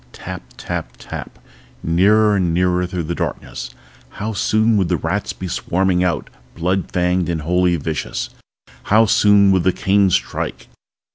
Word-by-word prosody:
Tap, - - -7 0.2
tap, - - -5
tap - - -8 0.5
nearer 105 +5 +4
and 90 -4 +1
nearer 90 0 +1
through 90 -1 -3
the 85 +2 -3
darkness. - - -4 0.5
How 110 +2 -3
soon 110 +2 +2
would 95 -3 +2
the 90 - +1
rats - - -2
be 95 - -6
swarming 90 +1 0
out, 90 -2 -1 0.2
blood 90 +3 -1
fanged 90 0 +1
and 85 -2 -1
wholly 90 +2 +2
vicious? 80 -1 -3 0.5
How 110 +2 +5
soon 100 -1 +5
would 95 -1 +3
the 95 - +3
cane 95 +2 +2
strike? - - -2
90 Hz, 150 wpm, -19 LUFS, 85-100 Hz, 0.5 s, How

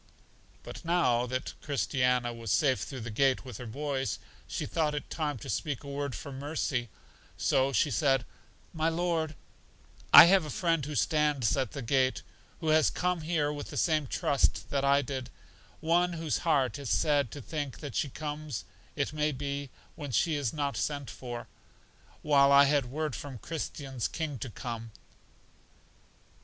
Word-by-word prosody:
But - - -9
now 145 -9 +2
that 130 +2 -3
Christiana 125 -4 +1
was 115 -3 -5
safe 135 0 +3
through 130 -4 -6
the 115 0 -5
gate 135 +4 +2
with 125 - -7
her 125 - -7
boys, 135 +2 -2 0.3
she - - -3
thought 155 -2 0
it 145 - -5
time 150 -4 -2
to 105 - -9
speak 145 -6 -2
a - - -10
word 140 -2 -3
for 140 - -7
Mercy, 135 -3 -2 0.5
so 135 +1 +2
she 145 +1 +2
said, 135 0 +2 0.5
My 160 0 +1
Lord, 165 -2 -1 0.8
I - - +13
have 190 +1 +5
a 155 - -6
friend 165 +1 +1
who 150 - -5
stands 150 -6 +2
at 130 -7 -1
the 140 - -5
gate, 130 +2 +1 0.4
who 160 - -1
has 155 0 +5
come 180 -1 -1
here 155 -2 0
with 145 -1 -6
the - - -6
same 155 -4 +2
trust 140 +2 +1
that 140 -1 +1
I 140 +1 +4
did; 130 -1 -5 0.5
one 175 +2 +2
whose 160 -5 -1
heart 145 -5 +1
is 140 -4 -5
sad 130 - +2
to 145 - -6
think 145 0 -5
that 145 -5 -6
she 145 - 0
comes, 150 -4 -5 0.3
it - - -1
may 150 0 +1
be, 140 0 -4 0.2
when 145 -3 -7
she 160 +6 +2
is 145 -5 0
not 145 -2 -2
sent 145 -3 -2
for; 120 -2 -7 0.8
while 140 -2 +5
I 140 0 +8
had 140 -2 +2
word 150 +1 -3
from 140 -3 -7
Christian's 135 - -4
King 155 -5 -4
to 120 - -5
come. 115 0 -6
140 Hz, 170 wpm, -30 LUFS, 130-155 Hz, 0.8 s, I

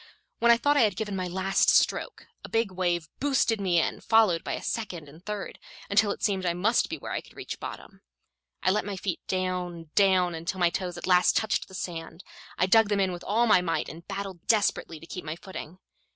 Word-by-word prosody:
When 235 - +3
I 235 - +7
thought 290 +5 +2
I - - +5
had 210 -5 +3
given 205 0 -3
my 185 -1 -2
last 190 +2 +2
stroke, - - +2 0.2
a - - -8
big 225 -3 +1
wave 175 -3 -1
boosted 260 -6 +1
me 180 -3 +3
in, - - -1
followed 220 -7 +3
by - - -3
a - - -5
second 180 -9 -4
and 155 +5 -15
third, 210 -1 -5 0.3
until 205 +1 +4
it - - -4
seemed 195 -3 +1
I 175 -1 0
must 215 +7 +2
be - - -4
where - - -7
I - - -2
could - - -19
reach - - -7
bottom. - - -9 0.6
I 185 - +4
let 210 0 +1
my 200 +1 -4
feet 185 -2 -3
down, 180 -3 -3
down, 185 -3 +4
until 170 +3 -4
my 175 -1 +3
toes 180 -1 -3
at - - -6
last 180 -1 +4
touched 220 -1 0
the 190 - -12
sand. 165 -1 -6 0.3
I - - +3
dug 220 +2 +5
them 205 -1 +1
in 190 -1 +2
with 175 - -8
all 225 +4 +2
my 210 -5 +5
might, 165 -3 -1
and 165 +2 -11
battled 195 -3 -6
desperately 205 -7 +1
to 165 - -12
keep 180 +2 -7
my 155 0 -4
footing. 185 -2 -9
185 Hz, 225 wpm, -27 LUFS, 175-210 Hz, 0.6 s, I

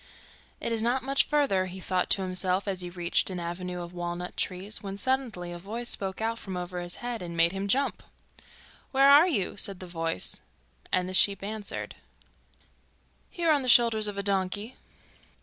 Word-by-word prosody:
'It - - -3
is 225 -1 +1
not 245 +3 +1
much 275 +1 +3
further,' 235 -11 +2
he 185 +1 -8
thought 185 -1 0
to 195 - +3
himself 185 +1 0
as 190 -2 -1
he 175 - -4
reached 175 +1 +1
an 185 -1 -4
avenue 175 +1 -4
of 170 +1 -9
walnut 175 0 -4
trees, 190 +3 -3
when 195 -1 -6
suddenly 230 -7 -1
a 175 - -6
voice 230 +6 -5
spoke 190 -1 -1
out 230 +1 -1
from 190 -4 -6
over 180 0 -4
his 175 0 -5
head, 240 -3 -3
and 170 -1 -6
made 165 +1 +5
him 195 +1 -3
jump. 275 +7 +1 0.9
'Where 270 0 +5
are 295 +5 +8
you?' 205 - 0
said 195 -2 +1
the 185 - -7
voice, 165 - -3 0.5
and 180 0 +1
the 185 - -5
sheep 195 +1 +3
answered: 210 0 -5 1.4
'Here 335 -2 +1
on 290 -2 +4
the 255 - -1
shoulders 230 -3 +5
of 205 -1 -4
a 200 - -2
donkey. 200 +4 -1
195 Hz, 185 wpm, -28 LUFS, 180-230 Hz, 1.4 s, are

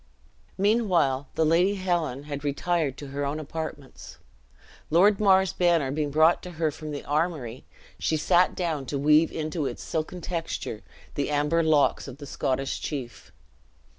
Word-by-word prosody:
Meanwhile 185 - +2
the 160 - +2
Lady 175 +6 +3
Helen 170 -8 -1
had 145 -1 -6
retired 145 0 -1
to 145 - -8
her 140 +1 -3
own 145 +2 -2
apartments. 150 -2 -7 0.7
Lord 190 +6 +4
Mar's 190 -3 +4
banner 170 -6 +2
being 150 0 -1
brought 155 +4 +4
to 180 - -9
her 160 -1 0
from 155 +1 -8
the 145 -1 -6
armory, 145 -6 -2 0.3
she 160 - 0
sat 175 +3 +3
down 160 -7 -2
to 140 - -2
weave 150 +3 +4
into 155 -2 -2
its - - -6
silken 160 +2 -3
texture 165 -10 -4 0.3
the 140 0 -2
amber 150 +3 +2
locks 155 -3 +2
of 135 -1 -9
the 145 - -9
Scottish 135 0 -2
chief. 130 -6 -6
155 Hz, 155 wpm, -26 LUFS, 145-175 Hz, 0.7 s, Lord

